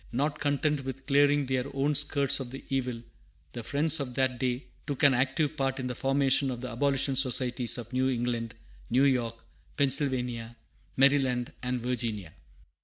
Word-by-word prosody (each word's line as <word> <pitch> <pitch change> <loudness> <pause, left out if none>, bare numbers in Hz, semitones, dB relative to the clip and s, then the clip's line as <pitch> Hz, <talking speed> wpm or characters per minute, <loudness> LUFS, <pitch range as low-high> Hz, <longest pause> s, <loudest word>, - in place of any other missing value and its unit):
Not 145 +5 -1
content 145 0 0
with 135 0 -6
clearing 145 0 +4
their 130 -1 -1
own 140 +2 +1
skirts 140 -2 +2
of 130 -3 -5
the 135 +2 -8
evil, 125 -3 -2 0.5
the 120 - -6
Friends 150 +6 +1
of 125 -3 -5
that 130 -2 +1
day 125 0 -1 0.2
took 145 0 -3
an 140 -2 +7
active 135 +4 +1
part 135 -2 -1
in 130 - -3
the 125 - -2
formation 135 +1 +2
of 125 -2 -4
the 125 0 -6
abolition 135 +2 +1
societies 125 -2 +1
of 120 0 -8
New 130 +1 +2
England, 120 -2 -2 0.3
New 130 +3 +3
York, 125 -4 +2 0.4
Pennsylvania, 125 -4 0 0.4
Maryland, 130 -3 +3
and 125 -1 -2
Virginia. 115 -8 -3
130 Hz, 165 wpm, -29 LUFS, 125-140 Hz, 0.5 s, an